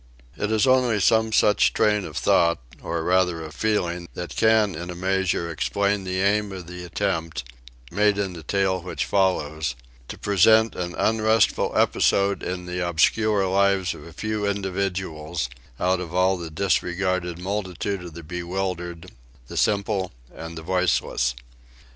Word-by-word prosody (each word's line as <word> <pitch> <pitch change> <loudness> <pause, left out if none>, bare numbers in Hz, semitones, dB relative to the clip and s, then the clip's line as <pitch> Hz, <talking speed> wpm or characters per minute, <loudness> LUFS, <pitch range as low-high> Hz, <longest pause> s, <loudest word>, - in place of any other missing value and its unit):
It 105 +1 -2
is 110 +1 +3
only 130 -4 +3
some 110 +2 +3
such 105 -1 +4
train 105 -2 +2
of 75 - -7
thought, 85 -1 +3 0.2
or 85 -1 -3
rather 90 -2 +2
of 80 -1 -9
feeling, 90 -4 -1
that 90 0 -6
can 110 -3 +3
in 85 +2 -6
a 90 - -5
measure 95 -2 0
explain 100 +4 0
the 95 0 -2
aim 100 +1 +1
of 95 -2 -7
the 90 +1 -8
attempt, 85 -6 -2 0.5
made 105 0 +2
in 100 -2 -2
the 85 - -8
tale 95 +2 0
which 90 - -3
follows, 80 -8 0 0.3
to - - -7
present 110 +2 +4
an 90 -1 -4
unrestful 110 0 +2
episode 100 0 +2
in 90 0 -4
the 90 0 -4
obscure 100 +5 +2
lives 95 -1 +2
of - - -11
a 85 - -11
few 105 +5 -3
individuals 95 -7 -2 0.3
out 90 0 +1
of 90 -1 -6
all 95 +1 +3
the 85 -3 -6
disregarded 90 0 0
multitude 95 0 -3
of 85 -3 -10
the 85 - -8
bewildered, 90 0 -4 0.4
the - - -8
simple 100 -2 0 0.2
and 80 0 -8
the 80 - -7
voiceless. 85 -8 +1
95 Hz, 155 wpm, -24 LUFS, 85-100 Hz, 0.5 s, such